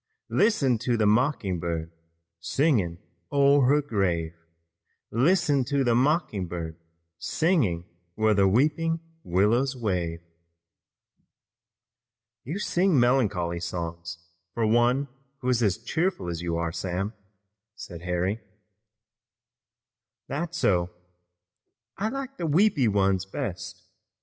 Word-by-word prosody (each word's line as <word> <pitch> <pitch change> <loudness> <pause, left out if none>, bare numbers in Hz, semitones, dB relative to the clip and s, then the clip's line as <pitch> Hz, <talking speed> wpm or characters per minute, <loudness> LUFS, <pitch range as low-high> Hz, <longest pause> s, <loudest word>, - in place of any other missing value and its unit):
Listen 140 - +2
to 120 0 0
the 110 - +2
mocking 105 - +1
bird, 80 -1 -3 0.5
singing 100 - +1 0.3
o'er 140 -1 +4
her 145 +2 +3
grave. 90 - -1 0.8
Listen 145 - +3
to 140 +1 +1
the 120 -2 +2
mocking 125 - +1
bird, 85 -2 -5 0.4
singing 125 - +1 0.3
where 110 0 +3
the 100 -1 +4
weeping 155 +9 +2 0.2
willows 115 +9 +2
wave." 90 -8 -2 2.2
"You 155 +9 -4
sing 185 -6 +2
melancholy 105 -9 +1
songs 85 -1 -5 0.4
for 115 - +1
one 120 +5 +3 0.3
who 125 - -1
is 125 -2 +2
as 100 -5 +2
cheerful 135 - -2
as 85 -1 -4
you 85 -1 -2
are, 85 0 -1
Sam," 95 +5 -3 0.6
said 85 -5 -9
Harry. 90 +5 -1 1.9
"That's 170 +5 -3
so. 90 - +2 1.1
I 210 +3 -1
like 275 +1 -6
the 170 - -2
weepy 155 - +3
ones 95 -2 +1
best. - - -5
115 Hz, 110 wpm, -26 LUFS, 90-145 Hz, 2.2 s, o'er